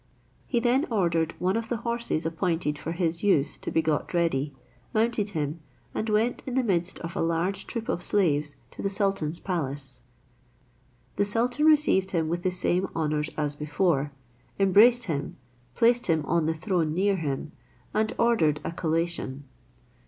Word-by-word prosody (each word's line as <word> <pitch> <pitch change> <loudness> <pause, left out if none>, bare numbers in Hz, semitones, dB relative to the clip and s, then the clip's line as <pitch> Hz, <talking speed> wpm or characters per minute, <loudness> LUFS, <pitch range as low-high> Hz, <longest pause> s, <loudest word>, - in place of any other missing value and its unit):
He 240 - +1
then 255 +6 +2
ordered 170 -7 +1
one 185 +2 0
of 225 0 -2
the 240 - 0
horses 235 -9 -1
appointed 165 -2 -1
for 165 - -4
his 170 -1 -1
use 170 -9 +2
to - - -4
be 160 - +1
got 155 +2 -1
ready, 155 -4 +1 0.4
mounted 220 -2 +1
him, 150 +2 -2 0.3
and 220 - -2
went 220 +3 +1
in 255 - -3
the 260 - +3
midst 180 -5 0
of 170 0 -6
a - - -1
large 170 +4 -1
troop 230 -2 -4
of 175 - -1
slaves 150 -8 +1 0.2
to - - -8
the 195 - 0
sultan's 195 -6 -1
palace. 140 -8 -4 1.2
The 205 - +3
sultan 245 +8 +1
received 295 -12 +4
him 165 -4 0
with 175 +1 -1
the 185 - +1
same 180 +1 0
honours 155 -1 0
as 150 -1 -1
before, 150 -1 0 0.5
embraced 215 +6 +6
him, 155 -9 -3 0.4
placed 240 +1 +3
him 160 -3 +1
on 165 -1 +1
the 160 - 0
throne 160 -3 0
near 195 +2 +2
him, 150 -2 -3 0.4
and 215 0 +1
ordered 165 -11 +3
a 165 - -3
collation. 165 -4 -1
175 Hz, 165 wpm, -27 LUFS, 155-210 Hz, 1.2 s, embraced